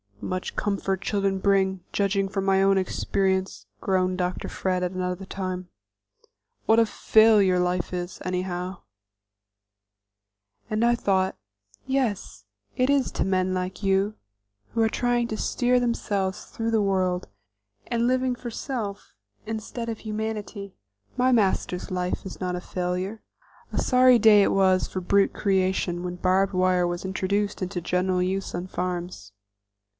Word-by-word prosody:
"Much 185 +8 -4
comfort 195 -1 -1
children 195 -2 0
bring, 190 -2 +2
judging 195 -1 +1
from 195 -1 -2
my 195 0 +3
own 195 0 +4
experience," 190 - -1 0.2
groaned 185 -1 +1
Dr. 180 0 -2
Fred 185 -1 -1
at 180 - -1
another 185 0 -3
time. 185 -1 -5 1.0
"What 225 +1 +5
a 230 - +5
failure 210 -4 +4
life 180 0 -1
is, 180 0 -4
anyhow!" 180 0 -3 1.9
And 215 +1 +1
I 240 0 +4
thought, 190 -4 0 0.5
"Yes, 215 - -2 0.3
it 255 +1 +2
is 280 -3 +2
to - - -1
men 185 -1 +1
like 185 +2 -4
you, 195 +2 +2 0.6
who 230 - +1
are 220 - +4
trying 240 0 0
to 220 - -3
steer 250 +2 +1
themselves 200 -5 -1
through 230 0 -3
the 220 -2 +2
world, 185 -2 0 0.6
and 235 0 +1
living 255 0 +1
for 240 -1 -7
self 220 -5 -5 0.3
instead 225 +2 -5
of 225 - -4
humanity. 215 -2 -5 0.4
My 255 +1 +3
master's 195 -5 +1
life 180 +1 -2
is 190 - -8
not 180 -1 -2
a 180 - -4
failure." 180 +4 -3 0.5
A - - -1
sorry 255 -1 +5
day 210 -2 +7
it - - +2
was 190 -1 +3
for 185 - -4
brute 200 +2 +3
creation 190 -3 0
when 180 0 -4
barb 190 +2 +2
wire 185 -1 +2
was 175 +1 -4
introduced 200 +2 -1
into 185 -1 -3
general 180 +1 0
use 190 +1 -2
on 175 +1 -4
farms. 175 - -4
190 Hz, 145 wpm, -25 LUFS, 185-215 Hz, 1.9 s, day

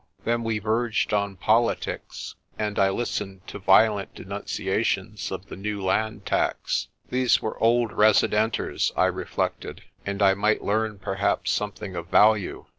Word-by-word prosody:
Then 115 0 0
we 115 -1 -1
verged 110 +1 0
on 100 -1 0
politics, 115 +5 -1 0.2
and 105 -1 -2
I 95 0 +4
listened 95 -3 -3
to - - -8
violent 100 +1 +3
denunciations - - -2
of - - -5
the - - -9
new 105 +2 -4
land 110 +3 -1
tax. - - 0 0.2
These 125 -1 +3
were 110 - -5
old 120 0 +3
residenters, 110 +1 +2
I - - +4
reflected, - - -3 0.2
and 100 0 -2
I 95 -1 +6
might 105 +2 +1
learn 110 0 0
perhaps 95 +1 -1
some 105 -1 -1
thing 95 -2 -8
of 85 -1 -5
value. 105 +1 +3
105 Hz, 145 wpm, -25 LUFS, 100-110 Hz, 0.2 s, I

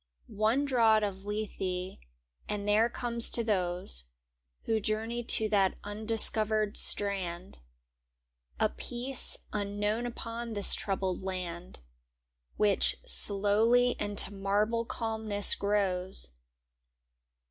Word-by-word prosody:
One 220 +7 0
draught 225 -5 +3
of 195 -1 -5
Lethe 190 -3 -5 0.5
and 205 0 -4
there 215 +3 +3
comes 235 -1 -2
to 235 - -1
those 180 - 0 0.6
Who 225 -1 0
journey 220 +3 -3
to 220 -2 +4
that 195 -3 +1
undiscovered 215 0 +3
strand, 190 -3 0 1.0
A - - +3
peace 245 - 0 0.2
unknown 210 +3 -2
upon 230 -1 -7
this 205 -1 +5
troubled 190 -2 -2
land. 180 - -7 0.8
Which 205 -2 +1
slowly 220 +5 +3
into 205 -1 +1
marble 210 +4 -1
calmness 220 -3 0
grows. 190 - -2
210 Hz, 95 wpm, -29 LUFS, 195-225 Hz, 1.0 s, this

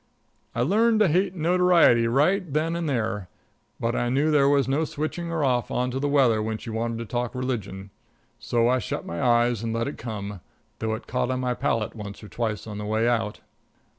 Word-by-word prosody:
I 120 - +1
learned 220 - +3
to 210 - +6
hate 180 +3 +1
notoriety 170 -8 +4
right 155 - +2
then 160 +3 0
and 170 -2 -2
there, 110 -7 -2 0.5
but 115 +1 -1
I 120 - 0
knew 140 +5 +2
there 140 -2 +4
was 140 -3 +3
no 140 +4 +1
switching 155 +3 -4
her 165 -2 -1
off 125 -3 +1
on 125 +1 -1
to 130 - -2
the 145 +1 0
weather 130 -6 +3
when 110 0 -2
she 115 - -8
wanted 115 +1 -2
to 115 - -5
talk 120 +2 -3
religion. 100 -7 -4 0.5
So 120 0 +1
I 130 +1 +3
shut - - -4
my 85 - -4
eyes 120 -2 +3
and 115 -1 -2
let 115 +2 -1
it 140 - -6
come, 105 -4 -6 0.4
though 110 0 -1
it - - -9
caught 125 -1 -1
on 130 0 -1
my 125 -1 0
palate 115 -2 -1
once 105 -1 -8
or 105 - -10
twice 110 -3 -3
on 105 -2 -6
the 105 - -5
way 110 +2 +1
out. 115 -3 -1
120 Hz, 215 wpm, -25 LUFS, 110-145 Hz, 0.5 s, to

